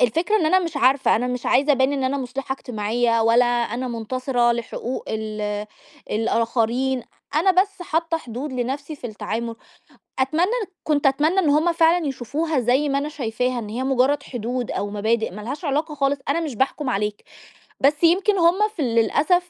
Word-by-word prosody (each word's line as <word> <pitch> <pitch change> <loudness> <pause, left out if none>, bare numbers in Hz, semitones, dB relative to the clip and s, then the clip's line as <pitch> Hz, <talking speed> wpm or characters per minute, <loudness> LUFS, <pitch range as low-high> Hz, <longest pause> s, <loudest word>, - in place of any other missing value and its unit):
الفكرة 330 - +2
إن 320 - +1
أنا 370 +4 +5
مش 330 -4 -3
عارفة، 265 -1 +3
أنا 245 - -1
مش 250 -1 -3
عايزة 285 +4 +4
أبان 265 +1 +2
إن 270 -2 -1
أنا 270 +2 0
مُصلِحة 265 +1 -4
إجتماعية 230 -2 0
ولا 230 +2 +5
أنا 240 +1 -1
مُنتصرة 240 +1 0
لحقوق 235 +2 -4
ال 210 -1 -3 0.4
الآخرين، 230 +3 0 0.3
أنا 335 +5 +4
بس 395 -3 -10
حاطّة 330 -1 0
حدود 255 +2 -6
لنَفْسي 275 +5 -3
في 245 - -7
التعامل. 230 +1 -4 0.6
أتمنى 320 - +1 0.3
كنت 290 -2 +1
أتمنى 300 +7 +2
إن 340 -6 +3
هم 310 +4 +3
فعلًا 330 0 +3
يشوفوها 280 +3 -1
زي 255 +5 +2
ما 275 0 +1
أنا 290 +2 -2
شايفاها، 250 -3 -2
إن 215 -3 -5
هي 235 +4 -3
مُجرّد 270 +2 +2
حدود 245 -1 -4
أو 205 - -3
مبادئ 220 +2 0
ما 210 +3 -9
لهاش 275 - -6
علاقة 300 +2 -1
خالص، 275 0 +1
أنا 315 +4 +1
مش 300 -7 -4
باحكُم 265 +3 -1
عليك. 210 -1 -2 0.6
بس 295 +4 +2
يمكن 380 +4 +4
هم 340 +1 +4 0.2
ف - - -11
للأسف 290 - +2
260 Hz, 170 wpm, -22 LUFS, 235-300 Hz, 0.6 s, أنا